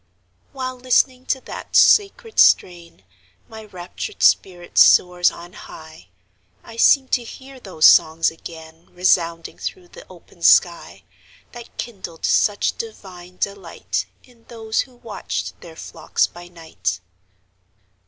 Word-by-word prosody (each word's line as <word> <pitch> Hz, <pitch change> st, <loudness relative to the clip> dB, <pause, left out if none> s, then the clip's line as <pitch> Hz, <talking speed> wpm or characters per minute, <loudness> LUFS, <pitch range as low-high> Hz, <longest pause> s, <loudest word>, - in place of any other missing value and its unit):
While 255 Hz, -1 st, -6 dB
listening 255 Hz, +1 st, 0 dB
to 265 Hz, -, -1 dB
that -, -, -9 dB
sacred 430 Hz, +2 st, +3 dB
strain, 170 Hz, -, +2 dB, 0.4 s
My 220 Hz, -1 st, -12 dB
raptured 185 Hz, -, -8 dB
spirit 175 Hz, -2 st, +1 dB
soars 180 Hz, -1 st, +5 dB
on 175 Hz, +1 st, -13 dB
high; 160 Hz, 0 st, -13 dB, 0.6 s
I 225 Hz, -, -13 dB
seem 265 Hz, +3 st, +4 dB
to 245 Hz, -, 0 dB
hear 265 Hz, +3 st, -13 dB
those 185 Hz, -9 st, -1 dB
songs 165 Hz, 0 st, +5 dB
again 160 Hz, 0 st, -13 dB
Resounding 170 Hz, -2 st, -1 dB
through 360 Hz, -2 st, -7 dB
the -, -, -14 dB
open -, -, -18 dB
sky, -, -, +2 dB, 0.5 s
That 240 Hz, -1 st, -13 dB
kindled 185 Hz, -8 st, -7 dB
such 205 Hz, -2 st, +1 dB
divine 180 Hz, -5 st, -10 dB
delight, 200 Hz, -4 st, -4 dB, 0.2 s
In 240 Hz, -3 st, -24 dB
those 225 Hz, -2 st, -5 dB
who 255 Hz, -2 st, -12 dB
watched 230 Hz, -3 st, -7 dB
their 165 Hz, -1 st, -13 dB
flocks -, -, -2 dB
by 175 Hz, 0 st, -12 dB
night. 160 Hz, -, -5 dB
185 Hz, 125 wpm, -20 LUFS, 170-245 Hz, 0.6 s, soars